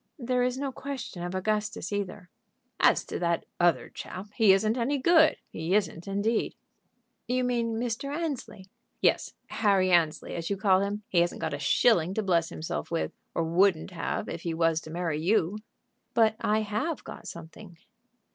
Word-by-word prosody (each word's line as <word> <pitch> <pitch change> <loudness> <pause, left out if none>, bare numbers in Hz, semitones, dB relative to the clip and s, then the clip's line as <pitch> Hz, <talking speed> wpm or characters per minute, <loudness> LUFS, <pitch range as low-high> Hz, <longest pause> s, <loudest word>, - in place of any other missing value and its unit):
"There 250 -2 0
is 250 +1 +1
no 275 0 -2
question 260 -9 -6
of 175 +1 -4
Augustus 210 0 -1
either." 190 -3 -4 0.5
"As - - +4
to - - -5
that 170 -1 0
other 175 -1 +3
chap, 195 +3 -8
he 220 -4 +5
isn't 215 +4 +3
any 255 +4 0
good; 315 +3 +5
he 165 +4 -1
isn't 195 -5 -1
indeed." 200 +3 0 0.7
"You 255 +1 +1
mean 235 -2 0
Mr. 240 +3 -2
Annesley?" 290 - -4 0.3
"Yes; - - +1
Harry 195 -4 +2
Annesley, 165 -3 +2
as 165 -1 -4
you 200 - -1
call 190 -2 +4
him. 205 +1 -2
He 175 - +2
hasn't 170 0 0
got - - -2
a 145 - -3
shilling 180 - +3
to 220 - 0
bless 170 -4 +2
himself 160 - -4
with, 165 -1 -1 0.2
or 165 - +1
wouldn't 175 +1 +2
have 175 - -3
if 165 - -5
he 165 -1 -3
was 165 -1 +2
to 155 - -11
marry 165 -2 -2
you." 195 +2 +1 0.6
"But 220 -2 +4
I 215 +1 +1
have 220 +10 -2
got - - -9
something." 170 +2 -10
200 Hz, 175 wpm, -28 LUFS, 170-230 Hz, 0.7 s, he